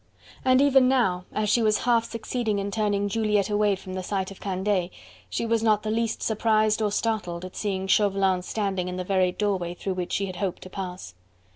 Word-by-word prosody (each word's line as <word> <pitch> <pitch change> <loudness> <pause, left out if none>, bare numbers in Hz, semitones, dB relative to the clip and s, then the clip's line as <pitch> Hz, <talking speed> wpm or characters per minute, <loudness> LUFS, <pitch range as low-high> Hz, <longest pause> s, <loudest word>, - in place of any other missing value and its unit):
And 255 +1 +5
even 270 -2 +5
now, 190 -9 +1
as 215 0 -1
she 230 +3 +3
was 215 -1 +3
half 235 -2 +3
succeeding 230 -2 -2
in 200 0 -2
turning 205 -1 0
Juliette 210 -1 +1
away 205 -1 +2
from 185 0 -9
the 185 - -3
sight 190 0 -2
of 195 - -11
Candeille, 190 -1 -1 0.4
she - - -2
was 230 -1 +1
not 215 -2 +2
the 215 - -2
least 230 0 -1
surprised 215 0 +2
or 210 -1 +1
startled 200 -6 -2
at 185 - -10
seeing 190 -2 -2
Chauvelin 195 -2 +2
standing 190 -1 -2
in 180 0 -4
the 185 - -2
very 185 -1 +2
doorway 185 -3 -1
through 190 +2 -3
which 180 -1 -4
she 200 - 0
had 185 -2 -6
hoped 195 -3 -3
to 185 - -11
pass. 185 - -6
205 Hz, 210 wpm, -26 LUFS, 185-220 Hz, 0.4 s, And